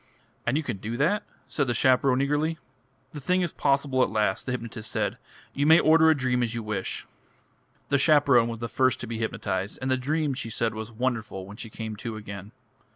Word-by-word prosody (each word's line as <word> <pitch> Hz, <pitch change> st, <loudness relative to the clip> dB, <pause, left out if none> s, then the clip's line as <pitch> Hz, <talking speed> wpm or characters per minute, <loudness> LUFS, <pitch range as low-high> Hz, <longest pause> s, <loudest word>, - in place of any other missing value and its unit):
"And 125 Hz, +4 st, +2 dB
you 160 Hz, -, -1 dB
can 120 Hz, -8 st, -3 dB
do 110 Hz, +4 st, -5 dB
that!" 170 Hz, +10 st, +2 dB, 0.3 s
said 145 Hz, -3 st, -1 dB
the 120 Hz, -, 0 dB
chaperone 130 Hz, +2 st, +3 dB
eagerly. 150 Hz, +3 st, 0 dB, 0.5 s
"The 150 Hz, -, -8 dB
thing 180 Hz, +6 st, +1 dB
is 170 Hz, -, -1 dB
possible 140 Hz, -2 st, +1 dB
at -, -, +3 dB
last," 105 Hz, -1 st, 0 dB
the -, -, -1 dB
hypnotist 115 Hz, -3 st, -4 dB
said. -, -, -1 dB, 0.3 s
"You 145 Hz, +1 st, +1 dB
may 160 Hz, +1 st, +8 dB
order 160 Hz, +1 st, +5 dB
a 160 Hz, -, +4 dB
dream 125 Hz, -2 st, +1 dB
as 120 Hz, -1 st, -1 dB
you 115 Hz, -, -3 dB
wish." 105 Hz, -3 st, -3 dB, 0.8 s
The 140 Hz, -, +3 dB
chaperone 140 Hz, -6 st, +5 dB
was 115 Hz, -, -4 dB
the 115 Hz, -, -2 dB
first 130 Hz, +2 st, +1 dB
to -, -, -4 dB
be 115 Hz, -1 st, -5 dB
hypnotised, 100 Hz, -3 st, -2 dB
and 130 Hz, 0 st, -2 dB
the 130 Hz, -, +3 dB
dream, 150 Hz, +2 st, 0 dB
she 120 Hz, -3 st, -5 dB
said, 115 Hz, 0 st, -1 dB
was 110 Hz, +1 st, -6 dB
wonderful, 110 Hz, -5 st, -2 dB
when 100 Hz, +2 st, -11 dB
she 115 Hz, -, -7 dB
came 110 Hz, 0 st, -6 dB
to 115 Hz, +1 st, -5 dB
again. 100 Hz, -1 st, -8 dB
125 Hz, 215 wpm, -26 LUFS, 110-140 Hz, 0.8 s, may